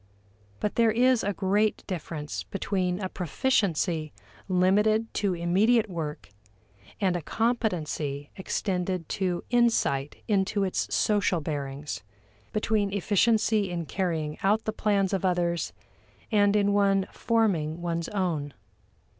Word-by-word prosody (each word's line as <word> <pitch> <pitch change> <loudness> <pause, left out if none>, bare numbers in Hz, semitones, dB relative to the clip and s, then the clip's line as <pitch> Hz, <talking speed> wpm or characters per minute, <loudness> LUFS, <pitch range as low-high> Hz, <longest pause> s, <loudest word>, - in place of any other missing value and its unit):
But 210 - -2
there 230 -1 +5
is 245 +2 +3
a 205 - 0
great 205 +3 +1
difference 155 -4 -5
between 185 -2 -2
a 190 - -2
proficiency 175 - 0 0.4
limited 210 +4 +2
to 200 -3 0
immediate 200 +6 +2
work, 155 - -5 0.7
and 185 -3 +1
a 175 - -2
competency 160 - -1
extended 185 -3 -2
to 180 -2 -1
insight 225 - +1
into 200 -1 +1
its 110 - -1
social 195 - +2
bearings; 145 -2 -4 0.5
between 210 -1 0
efficiency 210 +1 +2
in 170 -2 -3
carrying 160 -5 -2
out 210 +3 +2
the 215 - -1
plans 200 -3 +1
of 195 - 0
others 175 -2 0 0.6
and 205 -1 +4
in 205 -1 +3
one 195 -1 +3
forming 180 -9 0
one's 170 -1 -2
own. 165 -8 -2
190 Hz, 120 wpm, -27 LUFS, 170-210 Hz, 0.7 s, there